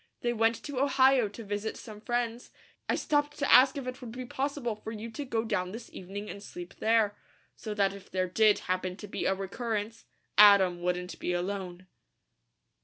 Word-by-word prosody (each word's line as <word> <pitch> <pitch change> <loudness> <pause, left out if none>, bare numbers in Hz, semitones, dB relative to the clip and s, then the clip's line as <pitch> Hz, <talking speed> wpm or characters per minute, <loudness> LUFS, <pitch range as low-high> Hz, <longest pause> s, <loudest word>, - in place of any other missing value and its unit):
They 240 0 0
went 225 0 +2
to 285 -3 -4
Ohio 265 -3 +4
to 205 +3 -9
visit 205 +1 -3
some 215 -3 -10
friends. 240 0 -2 0.4
I - - +3
stopped 290 0 0
to 285 - 0
ask 260 +2 +7
if 275 - -4
it 255 +1 -6
would 240 -3 -7
be 255 +1 -6
possible 265 -2 -2
for 215 +1 -8
you 225 +1 -7
to 290 - -5
go 230 -4 -1
down 185 -4 -2
this 230 +1 -9
evening 200 +3 -7
and 200 - -7
sleep 180 -3 -9
there, 220 -2 +3 0.4
so 215 -2 -6
that 195 -1 +2
if 200 -1 -12
there 185 -1 -1
did 210 +3 +4
happen 185 0 -1
to 210 - -9
be - - -4
a 190 - +2
recurrence, 220 +3 -4 0.3
Adam 195 -4 +7
wouldn't 180 0 -2
be 180 - -1
alone." 185 0 -4
215 Hz, 190 wpm, -29 LUFS, 195-240 Hz, 0.4 s, ask